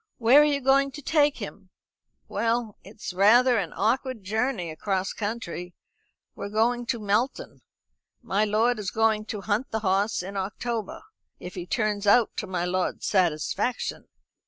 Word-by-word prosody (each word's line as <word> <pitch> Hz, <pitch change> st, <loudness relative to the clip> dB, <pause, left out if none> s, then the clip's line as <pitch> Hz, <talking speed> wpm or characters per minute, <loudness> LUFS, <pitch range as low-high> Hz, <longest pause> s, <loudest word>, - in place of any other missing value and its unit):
"Where 250 Hz, +5 st, +6 dB
are -, -, +6 dB
you 290 Hz, -2 st, +1 dB
going 275 Hz, +1 st, +3 dB
to 295 Hz, -, -8 dB
take 295 Hz, -1 st, +2 dB
him?" -, -, -8 dB, 0.6 s
"Well, 230 Hz, -2 st, -1 dB
it's 200 Hz, -1 st, -8 dB
rather 235 Hz, +6 st, +5 dB
an 175 Hz, -5 st, -3 dB
awkward 245 Hz, +2 st, 0 dB
journey 215 Hz, -3 st, -1 dB
across 190 Hz, +4 st, -2 dB
country. 205 Hz, -5 st, -5 dB, 0.6 s
We're 200 Hz, -, -6 dB
going 235 Hz, +3 st, +1 dB
to 235 Hz, -2 st, -1 dB
Melton. 215 Hz, +5 st, -1 dB, 0.6 s
My 210 Hz, -3 st, +1 dB
lord 215 Hz, +3 st, +2 dB
is 200 Hz, -3 st, -3 dB
going 220 Hz, 0 st, +1 dB
to 210 Hz, -2 st, -5 dB
hunt 220 Hz, +6 st, -1 dB
the 220 Hz, -, -2 dB
hoss 195 Hz, 0 st, +1 dB
in 195 Hz, +2 st, -6 dB
October, 230 Hz, -, -4 dB, 0.4 s
if 180 Hz, -, -8 dB
he 180 Hz, -1 st, -6 dB
turns 210 Hz, -2 st, -1 dB
out 230 Hz, +2 st, +4 dB
to -, -, -3 dB
my 180 Hz, -2 st, -2 dB
lord's 180 Hz, +1 st, -2 dB
satisfaction." 185 Hz, +6 st, 0 dB
215 Hz, 155 wpm, -26 LUFS, 195-245 Hz, 0.6 s, Where